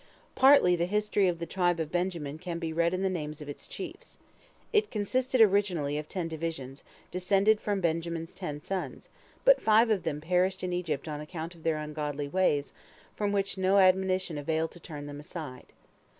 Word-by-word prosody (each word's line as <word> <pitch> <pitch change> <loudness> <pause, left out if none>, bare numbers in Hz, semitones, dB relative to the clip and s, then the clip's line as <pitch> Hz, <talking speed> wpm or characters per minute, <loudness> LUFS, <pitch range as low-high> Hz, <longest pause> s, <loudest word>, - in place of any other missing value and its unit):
Partly 265 -10 +6
the 170 0 0
history 210 0 +1
of 175 -2 0
the 170 - -4
tribe 175 -1 +1
of 160 -1 -3
Benjamin 170 -5 -2
can 175 -1 -4
be 165 -1 -3
read 170 +1 +2
in 185 +1 -2
the - - +3
names 155 -4 -4
of 150 - -8
its 145 - -7
chiefs. - - -8 0.6
It 425 0 +3
consisted 255 +4 +1
originally 190 -8 +3
of 150 - -7
ten 180 -3 -2
divisions, 160 -5 -5 0.3
descended 195 +4 +3
from 205 -2 -1
Benjamin's 165 0 -2
ten 150 0 -6
sons, 190 -1 -4 0.4
but - - +6
five 220 +1 +5
of 205 -4 +2
them 160 -3 -3
perished 180 +4 +1
in 180 -1 -2
Egypt 165 -5 -2
on 150 -1 -4
account 160 +2 -6
of 170 - -17
their 160 -1 0
ungodly 150 -1 -4
ways, 145 -4 +1 0.4
from 205 -1 -1
which 195 -1 -1
no 190 +1 +3
admonition 185 -3 +3
availed 160 +2 -1
to 175 - -13
turn 150 -3 -8
them 145 0 -7
aside. 150 -4 -8
175 Hz, 185 wpm, -29 LUFS, 155-190 Hz, 0.6 s, Partly